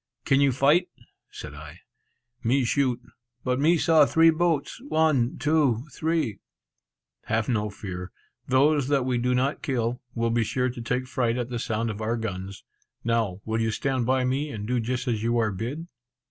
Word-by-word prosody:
"Can 135 0 +3
you 140 -1 +4
fight?" 150 +8 +3 0.4
said 75 - -9
I. 75 +3 -11 0.6
"Me 130 +3 +2
shoot; 130 -1 +1 0.4
but 125 0 0
me 165 +4 +4
saw 160 -1 +5
three 165 0 +5
boats; 165 - 0
one, 155 - +2
two, 145 -6 +2
three!" 160 -9 -1 0.9
"Have 110 0 0
no 105 -4 0
fear; 90 -3 -7 0.4
those 140 +1 +3
that 140 -3 +1
we 125 -2 0
do 125 +1 +1
not 135 +3 0
kill, 120 -2 -1
will 115 -1 0
be 115 0 +2
sure 125 +3 -1
to 120 - -8
take 125 +2 -1
fright 125 -3 0
at 120 -1 -3
the 120 -1 -3
sound 115 0 -1
of 105 +1 -7
our 115 +2 -1
guns. 100 -3 -5 0.4
Now 110 -5 0
will 110 0 -1
you 110 - +1
stand 130 +2 -1
by 130 0 +2
me, 135 +4 -1
and 105 -6 -5
do 125 0 +1
just 125 +3 -2
as 115 -3 0
you 115 +1 +1
are 110 -2 +1
bid?" 125 - -5
125 Hz, 180 wpm, -26 LUFS, 115-140 Hz, 0.9 s, saw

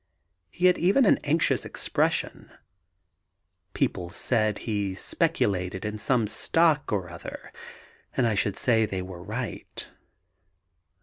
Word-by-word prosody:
He 180 - -1
had 180 - +5
even 200 +10 +4
an - - +5
anxious 155 +3 +2
expression. - - -1 1.3
People 85 -1 -1
said 110 +1 0
he 100 -4 -1
speculated 95 0 0
in 105 0 -4
some 120 0 +2
stock 150 +8 +2
or 95 -4 -1
other, 85 - -9 0.6
and 130 - +3
I 115 - +2
should 100 -1 0
say 110 -3 +3
they 95 -2 -3
were 90 -2 -9
right. 110 +5 -6
110 Hz, 120 wpm, -26 LUFS, 95-130 Hz, 1.3 s, had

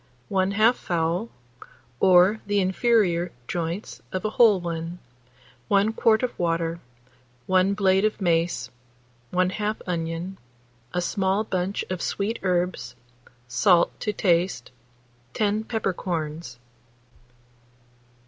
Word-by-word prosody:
1/2 200 +4 +3
fowl, 175 +2 -2 0.7
or 185 +3 +5
the 205 0 +2
inferior 185 -3 +2 0.2
joints 170 +4 -4
of 185 +1 -3
a 215 - 0
whole 220 -4 +5
one; 170 0 -4 0.7
1 205 +2 +3
quart 225 0 +3
of 250 - -3
water, 165 -1 -1 0.7
1 185 +1 +2
blade 195 -1 +3
of 215 0 0
mace, 170 -6 0 0.6
1/2 190 +4 0
onion, 170 +1 -4 0.5
a 180 - -1
small 190 +3 0
bunch 190 -1 -2
of 185 -2 -3
sweet 210 +3 -2
herbs, 175 -10 -1 0.5
salt 175 - +3
to 210 - -1
taste, 175 - 0 0.6
10 215 +1 0
peppercorns. 170 - -3
185 Hz, 100 wpm, -25 LUFS, 170-205 Hz, 0.7 s, or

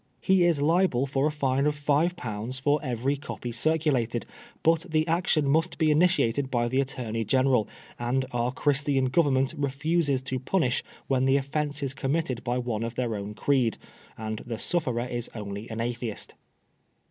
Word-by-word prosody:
He 185 +5 +3
is 160 -5 +2
liable 160 -5 +3
for 140 +1 +1
a - - 0
fine 140 -1 +1
of 150 - +1
five 150 +4 +1
pounds 115 -3 -4
for 145 +3 +2
every 130 +1 0
copy 135 -4 -6
circulated, 125 -3 +1 0.4
but 165 +2 +3
the 155 0 +1
action 165 -3 +2
must 160 +5 +1
be 155 -2 +3
initiated 145 -6 +2
by 120 -2 +1
the 130 +2 +2
Attorney 120 -4 -3
General, 130 -1 +2 0.3
and 125 +2 0
our 120 0 0
Christian 140 0 +1
Government 135 -1 +2
re 140 -2 -1
fuses 145 -1 0
to 130 0 -3
punish 130 -2 0 0.2
when 130 -1 +1
the 135 +1 +4
offence 145 +1 -2
is 135 -1 -1
committed 135 -2 -1
by 120 0 -1
one 120 -3 -2
of 115 +1 -3
their 120 -3 -1
own 100 +1 -5
creed, 125 -3 +1 0.4
and 110 -1 -4
the 120 -2 -5
sufferer 125 -6 0
is 120 -1 -3
only 100 0 -6
an 110 0 -5
Atheist. 120 -2 -3
135 Hz, 170 wpm, -27 LUFS, 120-150 Hz, 0.4 s, the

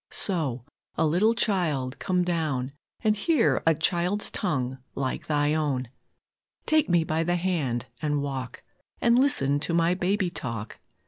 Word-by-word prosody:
So, 140 - +1 0.3
a 160 - +1
little 190 +9 +2
Child, 160 - -1
come 180 -2 0
down 155 -7 -1 0.3
And 215 -1 +3
hear 320 +8 +2
a 165 - +5
child's 175 +5 0
tongue 130 -2 -2 0.2
like 130 -2 -3
Thy 150 -1 +1
own; 140 -6 -1 0.8
Take 310 -6 +2
me 175 -2 +3
by 160 +1 -1
the 175 +1 0
hand 160 -10 -1 0.2
and 150 -1 0
walk, 130 -3 -5 0.4
And 235 +1 +4
listen 145 - +4
to 160 +3 -1
my 170 +1 +3
baby 185 0 0
talk. 115 -8 -6
160 Hz, 145 wpm, -26 LUFS, 135-180 Hz, 0.8 s, a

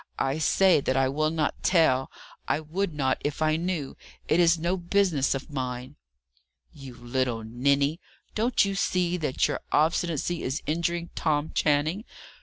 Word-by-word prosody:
I 135 +3 -1
say 185 +1 +4
that 130 -1 0
I 135 0 +3
will 155 +3 0
not 155 -2 -2
tell. 145 -7 +3 0.4
I - - +1
would 170 +5 -3
not 135 -3 -1
if 145 0 -2
I 155 0 +2
knew. 165 -4 -3 0.3
It 160 - +2
is 170 -1 +5
no 170 +3 0
business 175 -6 +1
of 135 +3 -7
mine." 130 0 -4 0.8
"You 135 -3 -11
little 120 -1 -2
ninny! 140 +7 +1 0.3
Don't 230 0 +2
you 195 - -2
see 180 -2 0
that 150 -6 0
your - - -2
obstinacy 165 +1 +1
is 130 +3 -3
injuring 170 +2 -2
Tom 155 -1 -1
Channing? 155 +7 +1
155 Hz, 155 wpm, -26 LUFS, 135-170 Hz, 0.8 s, is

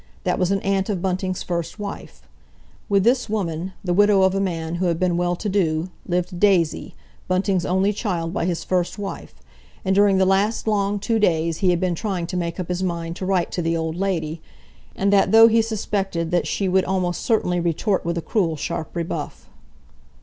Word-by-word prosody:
That - - 0
was 180 -1 +1
an 195 0 +1
aunt 195 0 0
of 200 -4 -1
Bunting's 185 0 -2
first 170 0 -3
wife. 205 -1 -8 0.7
With 200 -2 +3
this 245 0 +2
woman, 185 -3 -2
the 180 -2 0
widow 205 0 +5
of 190 0 +3
a 195 - 0
man 170 -3 -2
who 185 - +2
had 170 -1 0
been 180 -2 +1
well 175 0 0
to 210 - -5
do, 175 -3 0 0.2
lived 180 0 -2
Daisy, 180 -6 +2 0.3
Bunting's 185 0 +1
only 190 +3 +2
child 175 -6 -2
by - - -1
his 175 -2 -2
first 180 +1 -1
wife, 200 -1 -6 0.5
and 190 - +2
during 200 0 +4
the 190 - +4
last 200 +4 +1
long 205 -1 +1
two 225 +3 0
days 165 -4 +1
he 190 - +2
had 175 -1 +2
been 185 -1 0
trying 185 -1 -2
to 175 - -6
make 170 0 -3
up 180 - -3
his 180 0 -2
mind 170 -2 -3
to 185 - -4
write 185 -3 +1
to 180 - -2
the 165 0 0
old 160 0 -2
lady, 170 -4 -2 0.5
and 200 +1 +1
that 195 -1 +4
though 225 +1 +9
he 230 0 +4
suspected 195 -6 -2
that 175 -1 +1
she 195 - -1
would 190 0 +3
almost 180 -2 -1
certainly 180 -6 +1
retort 175 +4 0
with 170 0 -2
a 165 - -3
cruel, 165 -2 0
sharp 160 +3 -5
rebuff. 170 -1 -5
185 Hz, 205 wpm, -22 LUFS, 170-200 Hz, 0.7 s, though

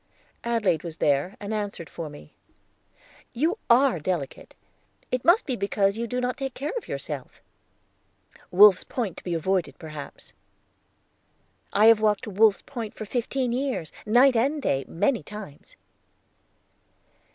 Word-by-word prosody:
Adelaide 215 -9 +1
was 165 -2 -7
there, 145 +7 +1
and 205 +1 -5
answered 205 -6 -4
for 165 -3 -7
me. 145 0 -13 1.0
"You 320 - 0
are 245 -5 +5
delicate. 155 -3 -4 0.6
It 255 -1 -1
must 350 +7 +4
be 260 - -2
because 200 -2 +1
you 235 +1 -3
do 250 +2 -2
not 250 0 -2
take 270 -2 -4
care 290 +4 -4
of 480 - -5
yourself." - - -5 1.1
"Wolf's 195 +1 +7
Point 220 -9 -3
to - - -10
be 175 -2 -2
avoided, 185 +2 -1
perhaps!" 155 -3 -10 1.4
"I 210 - +4
have 225 -1 +7
walked 210 -2 +2
to 210 - -6
Wolf's 210 +1 +3
Point 235 -6 -6
for 215 - -6
fifteen 245 +3 -1
years, 255 - -2
night 245 +4 +5
and 275 +7 +1
day, 135 - -1
many 240 +8 0
times." 210 -9 -11
215 Hz, 140 wpm, -25 LUFS, 180-250 Hz, 1.4 s, Wolf's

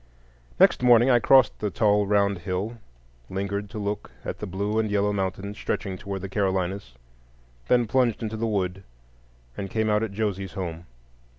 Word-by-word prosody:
Next - - +5
morning 120 +1 +6
I 120 - +5
crossed 130 +2 +5
the 105 - -1
tall 105 -1 +2
round 100 -2 +2
hill, 95 +6 -4 0.5
lingered 100 +1 -3
to 110 - -8
look 105 0 -3 0.2
at - - -5
the - - -5
blue 100 +4 -1
and 110 -1 0
yellow 105 0 +1
mountains 95 +1 -3
stretching 95 -3 -3
toward 95 +1 -6
the 100 - -4
Carolinas, 95 - -1 0.7
then 120 -1 +4
plunged 120 -1 +1
into 110 0 -3
the 115 +1 -1
wood, 95 -3 -1 0.7
and 95 -1 -5
came 110 +1 0
out 105 0 +2
at 110 -2 -2
Josie's 100 -2 -3
home. 85 -3 -5
100 Hz, 170 wpm, -25 LUFS, 95-110 Hz, 0.7 s, morning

